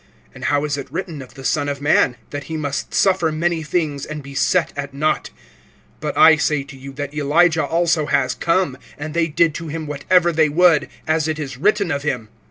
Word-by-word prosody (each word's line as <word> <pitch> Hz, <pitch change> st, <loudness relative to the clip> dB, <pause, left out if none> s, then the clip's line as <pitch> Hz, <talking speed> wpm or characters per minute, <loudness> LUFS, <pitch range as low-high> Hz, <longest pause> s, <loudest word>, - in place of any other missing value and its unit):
And -, -, -8 dB
how 145 Hz, 0 st, +1 dB
is 145 Hz, -1 st, -2 dB
it 135 Hz, -, -8 dB
written 165 Hz, -3 st, -5 dB
of 130 Hz, -, -13 dB
the 135 Hz, -, -10 dB
Son 145 Hz, +1 st, 0 dB
of 140 Hz, -1 st, -3 dB
man? 145 Hz, -3 st, +3 dB, 0.2 s
That 145 Hz, -1 st, -5 dB
he 160 Hz, +2 st, -4 dB
must 145 Hz, -2 st, -3 dB
suffer 185 Hz, -4 st, +2 dB
many 165 Hz, +1 st, 0 dB
things, 155 Hz, -3 st, -2 dB
and 150 Hz, -1 st, -6 dB
be 140 Hz, 0 st, -10 dB
set 170 Hz, +5 st, +1 dB
at 140 Hz, -1 st, -5 dB
naught. 155 Hz, +2 st, 0 dB, 0.7 s
(13)But -, -, -3 dB
I 160 Hz, -1 st, +7 dB
say 150 Hz, -2 st, 0 dB
to 140 Hz, 0 st, -12 dB
you, 135 Hz, +1 st, -9 dB
that 145 Hz, 0 st, -5 dB
Elijah 160 Hz, +3 st, +3 dB
also 165 Hz, -2 st, +1 dB
has 130 Hz, -3 st, +1 dB
come, 165 Hz, -3 st, 0 dB, 0.2 s
and 150 Hz, +1 st, -6 dB
they 170 Hz, 0 st, +1 dB
did 160 Hz, +1 st, +2 dB
to 165 Hz, +1 st, -6 dB
him 160 Hz, +1 st, -5 dB
whatever 165 Hz, +5 st, +2 dB
they 160 Hz, -1 st, +3 dB
would, 160 Hz, -2 st, +4 dB, 0.2 s
as 155 Hz, 0 st, +1 dB
it 155 Hz, -1 st, -2 dB
is 140 Hz, -4 st, -5 dB
written 200 Hz, +3 st, +1 dB
of 140 Hz, -, -1 dB
him. 125 Hz, -7 st, -3 dB
155 Hz, 215 wpm, -20 LUFS, 140-165 Hz, 0.7 s, I